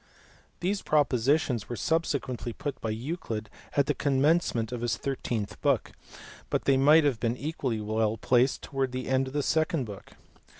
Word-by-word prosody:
These 195 +3 0
propo 150 -2 +3
sitions 125 -3 +1
were 120 - -3
subsequently 130 -5 -1
put 140 +1 -5
by 110 - -2
Euclid 115 -2 -4 0.3
at 140 - +5
the - - +1
commence 145 +4 +2
ment 115 0 -1
of 120 -2 -4
his 115 -2 0
thirteenth 115 -6 -3
book, 140 -6 +1 0.6
but - - -1
they 135 - +4
might 150 +4 +6
have 135 -6 +1
been 120 +1 0
equally 135 -6 -2
well 110 +1 0
placed 125 +3 +2
towards 135 -3 -2
the 130 0 -4
end 130 0 +1
of 130 - -8
the 145 -1 0
second 160 -3 +1
book. 100 -3 -10
130 Hz, 175 wpm, -28 LUFS, 115-145 Hz, 0.6 s, might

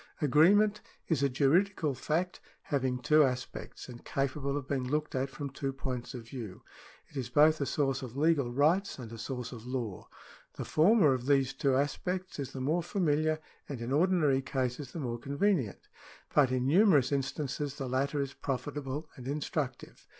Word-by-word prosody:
Agreement 200 +9 +4 0.3
is 160 -5 +2
a 140 - +3
juridical 155 +4 +2
fact 160 +7 -2 0.2
having 130 -3 0
two 150 +5 +5
aspects, 130 -2 -4
and 120 -2 -10
capable 140 +1 -1
of 140 -2 -5
being 135 -3 -1
looked 150 +3 -1
at 135 +1 -1
from 140 +2 -5
two 135 0 -3
points 130 -1 -5
of 115 -2 -8
view. 115 -7 -8 0.5
It - - -19
is 125 -3 -3
both 150 +3 +5
a 140 - 0
source 135 -3 0
of 130 0 -7
legal 145 -5 +2
rights 160 +10 +2
and 120 -4 -8
a 115 - -8
source 125 +1 -5
of 120 -1 -9
law. 120 -7 -4 0.5
The - - -5
former 165 -2 +5
of 125 0 -4
these 135 -2 +3
two 135 -1 +1
aspects 180 +6 -2
is 140 - -4
the 135 - -6
more 155 +7 +1
familiar 155 -3 +1 0.3
and 135 -4 -5
in 120 +2 -4
ordinary 150 -3 +3
cases 130 0 -3
the 165 - -6
more 120 -4 -3
convenient, 140 - 0 0.5
but 135 -4 +4
in 130 -1 0
numerous 150 - +5
instances 140 0 -2
the 135 -3 -4
latter 140 +3 0
is 140 -1 -4
profitable 140 +2 -4
and 125 -2 -9
instructive. 140 -2 -4
140 Hz, 175 wpm, -31 LUFS, 130-155 Hz, 0.5 s, two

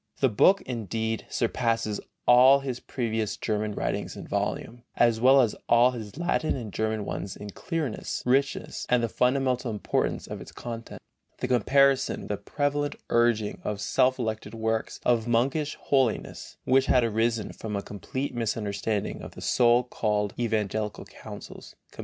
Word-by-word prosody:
The 135 - +4
book, 185 - +4
indeed, 110 -2 -3
surpasses 115 -3 0 0.2
all 130 +3 +7
his 130 -3 -4
previous 110 -4 -2
German 105 -1 -1
writings - - -3
in - - -7
volume, 120 +1 -3
as 115 -1 +3
well 135 +2 +7
as 115 -4 +1
all 120 +2 +6
his 110 -1 -8
Latin 170 -2 0
and 115 -7 -6
German 110 -1 -1
ones 95 - -4
in 105 0 -8
clearness, 155 - -3
richness 135 +3 0
and 125 -1 +3
the - - +2
fundamental 125 +1 +1
importance 105 -2 -1
of - - -7
its - - -10
content. 115 -1 -8 0.4
In - - -1
comparison 135 +3 +3
with - - -9
the 105 - -1
prevalent 145 +3 -1 0.2
urging 120 -3 +2
of 105 -1 -3
self 130 +5 +2
elected 110 -2 -4
works 110 0 -2
of 120 -2 +2
monkish 135 +6 +1
holiness, 130 -5 -1
which 130 +1 +3
had 125 - +4
arisen 115 -1 0
from 110 -2 -5
a 100 - -2
complete 130 +7 -5
misunderstanding 105 -3 -2
of - - -10
the - - -9
so 120 0 +4
called 105 -4 -1
evangelical 110 -2 -1
counsels - - -11 0.2
(comp. - - -20
115 Hz, 155 wpm, -27 LUFS, 110-130 Hz, 0.4 s, all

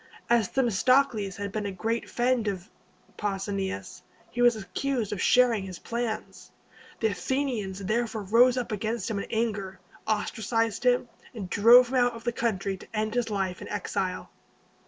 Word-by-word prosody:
As 235 -4 +4
Themistocles 240 -3 +2
had 200 0 -4
been 210 0 -3
a - - -3
great 225 +5 -2
friend 245 -2 +1
of 195 0 -4 0.5
Pausanias, 195 -1 -3 0.3
he 245 - -2
was 240 -1 +6
accused 215 +3 -2
of 200 -3 -3
sharing 240 -5 +4
his 185 -2 -7
plans. 235 +1 -4 0.5
The 220 - +3
Athenians 200 -2 -2
therefore 220 +1 -1
rose 240 +5 +5
up 245 -3 -2
against 220 +3 -2
him 205 - -1
in - - -5
anger, 205 -5 -2 0.3
ostracized 225 +1 -1
him, 245 0 +3 0.3
and 195 -5 -6
drove 235 +4 +7
him 260 - 0
out 245 0 +3
of 230 0 -10
the 240 - 0
country 200 -5 -1
to - - -14
end 215 0 -1
his 245 -2 0
life 190 -3 -2
in - - -7
exile. - - -3
220 Hz, 160 wpm, -27 LUFS, 200-240 Hz, 0.5 s, drove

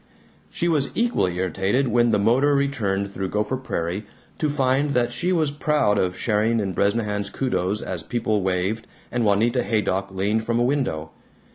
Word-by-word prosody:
She 170 - -2
was 150 -5 +1
equally 230 - +1
irritated, 95 +8 0
when 120 0 +3
the 110 - +3
motor 125 +8 +3
returned 100 -9 -1
through 95 -1 -3
Gopher 105 +4 -1
Prairie, 100 -5 -3 0.3
to 155 - +1
find 140 0 +1
that 120 -1 +2
she 175 +10 -1
was 160 -5 +2
proud 145 -8 +1
of 90 0 0
sharing 110 +1 +1
in 100 -3 -2
Bresnahan's 105 +1 0
kudos 105 -6 -1
as 90 -3 -4
people 110 -2 -1
waved, 95 +4 -1 0.2
and 120 -1 0
Juanita 115 +4 +2
Haydock 100 -4 0
leaned 100 +4 0
from 115 +1 0
a - - +3
window. 120 - -1
110 Hz, 165 wpm, -23 LUFS, 100-130 Hz, 0.3 s, when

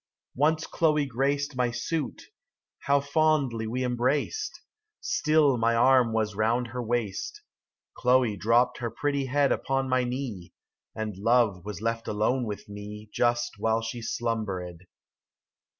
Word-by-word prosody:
35 - - -15
Once 155 +2 +2
Chloe 150 -3 +1
graced 140 +2 -1
My 125 -1 +1
suit; 130 +5 -3 0.6
how 140 0 +5
fondly 140 -6 +1
we 125 +3 -2
embraced! 130 - -1 0.4
Still 155 -4 +2
my 115 +1 +2
arm 125 0 +5
was 110 -1 0
round 115 +4 0
her 125 +1 -4
waist: 115 -4 -3 0.5
Chloe 125 -3 +3
dropt 115 +5 +2
her 120 -2 -2
pretty 140 +3 -1
head 140 +1 +2
Upon 135 0 0
my 130 -1 +2
knee, 120 -8 -5 0.4
And 110 -2 -4
Love 110 -4 +2
was 105 -2 -6
left 115 0 -2
alone 115 +4 0
with 105 -1 -6
me 105 +1 -9
Just 120 -2 0
while 110 +1 +1
she 115 +1 -5
slumbered. 95 -7 -3
120 Hz, 135 wpm, -27 LUFS, 110-135 Hz, 0.6 s, how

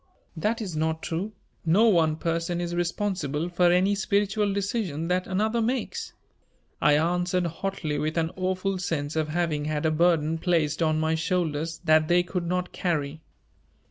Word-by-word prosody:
"That 220 +7 -1
is 180 -6 -5
not 160 +1 -1
true; 180 +6 -3 0.3
no 190 +8 +4
one 165 -7 +3
person 165 +1 -2
is 175 0 -3
responsible 175 -3 -1
for 175 0 +3
any 185 +3 +3
spiritual 205 +1 +1
decision 195 -5 -2
that 180 0 0
another 220 +5 0
makes," 260 - -2 0.7
I 145 0 +5
answered 175 +2 +1
hotly 165 -3 -3
with 155 +2 -2
an 165 0 +1
awful 185 +1 -1
sense 155 -4 -2
of 155 -1 0
having 155 -2 -1
had 150 0 -2
a 160 - +3
burden 165 -1 +2
placed 160 -3 +1
on 155 -1 +2
my 160 0 +1
shoulders 160 -2 -1
that 155 -1 +4
they 175 +1 +4
could 175 -1 -3
not 180 +1 -1
carry. 155 -3 -2
175 Hz, 160 wpm, -26 LUFS, 160-185 Hz, 0.7 s, I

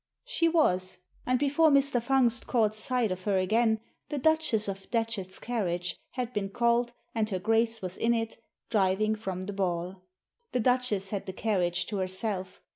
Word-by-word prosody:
She 335 -9 +2
was. 185 - +2 0.3
And 255 0 +3
before 290 +4 +4
Mr. 280 -3 +3
Fungst 250 -1 +2
caught 220 -4 +2
sight 230 0 -1
of 185 0 -5
her 200 -2 +2
again 220 +4 +2 0.3
the 295 - -2
Duchess 315 -8 +2
of 195 -1 -6
Datchet's 225 -5 -2
carriage 180 -7 -2 0.2
had 250 -1 -3
been 195 -2 -2
called, 235 +3 +1 0.2
and 220 -2 0
her 190 - -1
Grace 225 +2 +1
was 185 0 -4
in 235 +1 +3
it, 225 -1 -3 0.3
driving 210 0 +2
from 190 -4 -4
the 205 +2 -5
ball. 180 -1 -2 0.5
The 250 - +1
Duchess 245 -5 +1
had 200 -2 -3
the 190 - -4
carriage 180 -4 0
to 210 - -4
herself. 185 0 -1
220 Hz, 170 wpm, -29 LUFS, 190-240 Hz, 0.5 s, before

